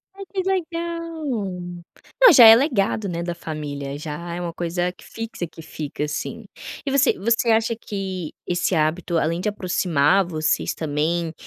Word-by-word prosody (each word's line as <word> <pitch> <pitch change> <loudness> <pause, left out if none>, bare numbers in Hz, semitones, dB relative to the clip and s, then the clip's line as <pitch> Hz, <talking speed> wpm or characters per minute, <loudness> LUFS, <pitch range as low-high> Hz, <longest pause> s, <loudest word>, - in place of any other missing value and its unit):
Ah, 395 - -11
que 380 - 0
legal. 335 -3 -3 1.0
Não, - - +10
já 240 -4 +10
é 225 0 +11
legado, 220 -6 +1
né, 170 -1 -3
da 175 0 -3
família, 145 -4 -5
já 155 +3 -6
é 175 - -4
uma 170 -1 -4
coisa 175 +1 -2
que 180 - -19
fixa, 225 -6 -6
que 165 - -13
fica, 150 -1 -5
assim. 175 +9 -5 0.4
E 275 - -1
você 275 0 +4
você 230 +3 +1
acha 225 +1 +2
que 190 -6 -5
esse 175 +1 0
hábito, 165 +2 0
além 165 +2 0
de 210 - 0
aproximar 180 -2 +2
vocês 155 -3 0
também, 160 +2 -1
180 Hz, 160 wpm, -22 LUFS, 160-230 Hz, 1.0 s, é